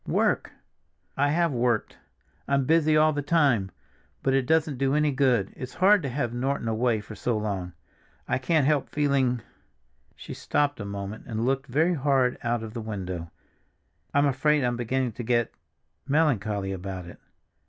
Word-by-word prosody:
"Work." -, -, +1 dB, 0.6 s
"I 145 Hz, +1 st, +2 dB
have 170 Hz, +2 st, +2 dB
worked! 120 Hz, -3 st, 0 dB, 0.5 s
I'm 140 Hz, -1 st, +1 dB
busy 155 Hz, 0 st, +3 dB
all 155 Hz, 0 st, +4 dB
the 145 Hz, -, -1 dB
time, 140 Hz, -, +2 dB, 0.5 s
but 135 Hz, -, +2 dB
it 135 Hz, -2 st, +1 dB
doesn't 160 Hz, -4 st, +1 dB
do 135 Hz, +1 st, +1 dB
any 150 Hz, -1 st, +2 dB
good. 125 Hz, -7 st, +1 dB
It's 130 Hz, 0 st, -8 dB
hard 195 Hz, +2 st, +5 dB
to 140 Hz, -, -3 dB
have 120 Hz, -2 st, -2 dB
Norton 130 Hz, 0 st, -2 dB
away 115 Hz, 0 st, +1 dB
for 105 Hz, -, -10 dB
so 115 Hz, +1 st, -1 dB
long. 95 Hz, -4 st, -3 dB, 0.5 s
I -, -, 0 dB
can't 150 Hz, +2 st, +2 dB
help 145 Hz, -1 st, +1 dB
feeling—" 135 Hz, -5 st, +1 dB, 0.7 s
she -, -, -9 dB
stopped 145 Hz, -2 st, 0 dB
a 100 Hz, -, -5 dB
moment 100 Hz, +1 st, -6 dB
and 110 Hz, 0 st, -2 dB
looked 135 Hz, +1 st, 0 dB
very 160 Hz, +7 st, +2 dB
hard 135 Hz, -4 st, +1 dB
out 120 Hz, -1 st, -1 dB
of 110 Hz, -1 st, -7 dB
the 120 Hz, -, -5 dB
window. 95 Hz, -6 st, -5 dB, 0.8 s
"I'm 145 Hz, +1 st, +3 dB
afraid 145 Hz, +1 st, +2 dB
I'm 120 Hz, 0 st, 0 dB
beginning 125 Hz, +1 st, -1 dB
to 120 Hz, +3 st, -7 dB
get—melancholy 120 Hz, -2 st, -1 dB
about 95 Hz, -1 st, -5 dB
it." 85 Hz, -, -12 dB
130 Hz, 165 wpm, -26 LUFS, 110-145 Hz, 0.8 s, hard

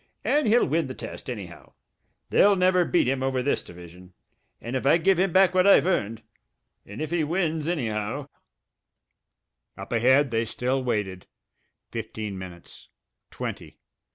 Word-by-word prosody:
And 295 Hz, -4 st, +2 dB
he'll 230 Hz, +3 st, +4 dB
win 155 Hz, +1 st, 0 dB
the 130 Hz, -, -7 dB
test, -, -, -8 dB
anyhow... 100 Hz, -8 st, -8 dB, 0.6 s
they'll 205 Hz, 0 st, +5 dB
never 185 Hz, -1 st, +3 dB
beat 175 Hz, -, +2 dB
him 130 Hz, 0 st, 0 dB
over 130 Hz, -1 st, -1 dB
this 140 Hz, -, 0 dB
division... 90 Hz, +1 st, -14 dB, 0.5 s
if 125 Hz, +3 st, -4 dB
I 145 Hz, +5 st, +5 dB
give 180 Hz, +2 st, +2 dB
him 190 Hz, 0 st, +2 dB
back 185 Hz, +1 st, +4 dB
what 185 Hz, +1 st, +3 dB
I've 200 Hz, -, +6 dB
earned... 115 Hz, -, -1 dB, 0.6 s
and 105 Hz, +10 st, -6 dB
if 155 Hz, -, -5 dB
he 170 Hz, -2 st, +1 dB
wins 160 Hz, -1 st, -1 dB
anyhow 120 Hz, -3 st, -2 dB, 0.7 s
" -, -, -55 dB
Up -, -, -9 dB
ahead 130 Hz, +4 st, +3 dB
they 115 Hz, 0 st, +1 dB
still 125 Hz, +4 st, -2 dB
waited. 105 Hz, -7 st, -3 dB, 0.6 s
Fifteen 105 Hz, -2 st, -5 dB
minutes. 90 Hz, -2 st, -11 dB, 0.4 s
Twenty. -, -, -7 dB
130 Hz, 150 wpm, -25 LUFS, 110-175 Hz, 0.7 s, I've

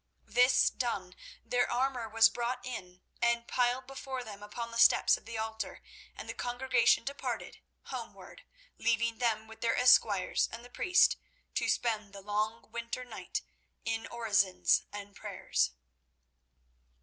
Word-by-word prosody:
This 250 Hz, +1 st, +4 dB
done, 195 Hz, -7 st, -3 dB, 0.3 s
their 245 Hz, 0 st, +1 dB
armour 250 Hz, -2 st, 0 dB
was 225 Hz, +1 st, +6 dB
brought 245 Hz, +2 st, -3 dB
in 180 Hz, -8 st, -7 dB, 0.2 s
and 235 Hz, 0 st, +2 dB
piled 250 Hz, +1 st, +1 dB
before 265 Hz, -1 st, -6 dB
them 205 Hz, -3 st, -9 dB
upon 230 Hz, +3 st, -6 dB
the 230 Hz, -, -4 dB
steps -, -, +6 dB
of -, -, -12 dB
the 225 Hz, 0 st, -6 dB
altar, 220 Hz, 0 st, -4 dB, 0.3 s
and -, -, -8 dB
the -, -, -4 dB
congregation 245 Hz, -1 st, +2 dB
departed 280 Hz, +3 st, -4 dB, 0.2 s
homeward, -, -, -8 dB, 0.4 s
leaving 230 Hz, 0 st, +1 dB
them 220 Hz, -3 st, +1 dB
with 220 Hz, 0 st, -14 dB
their 230 Hz, -, +1 dB
esquires 215 Hz, -6 st, +4 dB
and 235 Hz, +1 st, -8 dB
the 245 Hz, -, -14 dB
priest 360 Hz, +6 st, +4 dB, 0.4 s
to -, -, 0 dB
spend 215 Hz, -4 st, 0 dB
the 200 Hz, -, -9 dB
long 215 Hz, +3 st, -2 dB
winter 235 Hz, +2 st, -4 dB
night -, -, -5 dB, 0.4 s
in 225 Hz, 0 st, -2 dB
orisons 200 Hz, -5 st, +2 dB
and 205 Hz, -1 st, -8 dB
prayers. 65 Hz, -, -1 dB
230 Hz, 140 wpm, -31 LUFS, 215-245 Hz, 0.4 s, was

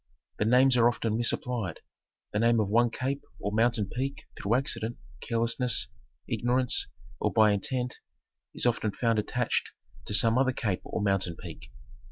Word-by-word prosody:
The 105 Hz, -, +2 dB
names 125 Hz, +2 st, +5 dB
are 120 Hz, 0 st, +6 dB
often 115 Hz, -2 st, -1 dB
misapplied. 115 Hz, -4 st, -1 dB, 0.5 s
The 105 Hz, -, +1 dB
name 115 Hz, 0 st, +4 dB
of 105 Hz, -3 st, 0 dB
one 120 Hz, +3 st, +4 dB
cape 135 Hz, +4 st, -3 dB, 0.2 s
or 100 Hz, -, -2 dB
mountain 115 Hz, 0 st, +2 dB
peak 135 Hz, +6 st, -4 dB
through 105 Hz, +4 st, 0 dB
accident, 120 Hz, -3 st, -1 dB, 0.2 s
carelessness, 115 Hz, 0 st, -1 dB, 0.4 s
ignorance, 125 Hz, +1 st, +1 dB, 0.3 s
or 105 Hz, -, 0 dB
by 110 Hz, -1 st, +5 dB
intent 125 Hz, +5 st, -2 dB, 0.6 s
is -, -, 0 dB
often 115 Hz, -3 st, +1 dB
found 115 Hz, -2 st, +1 dB
attached 120 Hz, +3 st, -1 dB, 0.4 s
to 105 Hz, -, 0 dB
some 115 Hz, +5 st, +5 dB
other 130 Hz, -1 st, +2 dB
cape 105 Hz, -7 st, -2 dB
or -, -, -3 dB
mountain 95 Hz, -4 st, +1 dB
peak. -, -, -10 dB
115 Hz, 155 wpm, -28 LUFS, 105-125 Hz, 0.6 s, are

